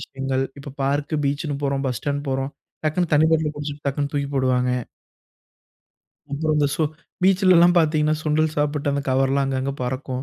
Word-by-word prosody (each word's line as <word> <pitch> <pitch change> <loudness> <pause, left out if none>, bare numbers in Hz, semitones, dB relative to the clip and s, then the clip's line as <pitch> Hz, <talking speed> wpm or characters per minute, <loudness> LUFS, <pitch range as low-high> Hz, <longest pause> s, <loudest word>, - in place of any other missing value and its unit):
விஷயங்கள். 135 0 -2
இப்ப 140 -1 -9
பார்க், 145 +3 0
பீச்ன்னு 145 +1 -1
போறோம், 140 0 -1
பஸ் 125 -2 -1
ஸ்டாண்ட் 145 0 -2
போறோம், 135 +1 -1 0.3
டக்குனு 155 +2 0
தண்ணீ 150 +2 +5
பாட்ல 160 -1 +2
குடிச்சுட்டு 145 0 -6
டக்குனு 140 +1 -1
தூக்கி 140 -1 -1
போடுவாங்க. 125 -1 +2 1.6
அப்புறம் 155 +2 0
அந்த 145 -1 +3
ஸோ 160 - 0 0.4
பீச்‌ல 185 -1 +5
எல்லாம் 175 +1 +6
பார்த்தீங்கன்னா 155 -1 +2
சுண்டல் 155 0 +1
சாப்பிட்டு 145 -1 0
அந்த 140 0 -1
கவர்லா 135 +1 +2
அங்க 135 -1 -1
அங்க 135 +1 -2
பறக்கும். 130 +1 -3
145 Hz, 165 wpm, -23 LUFS, 135-155 Hz, 1.6 s, எல்லாம்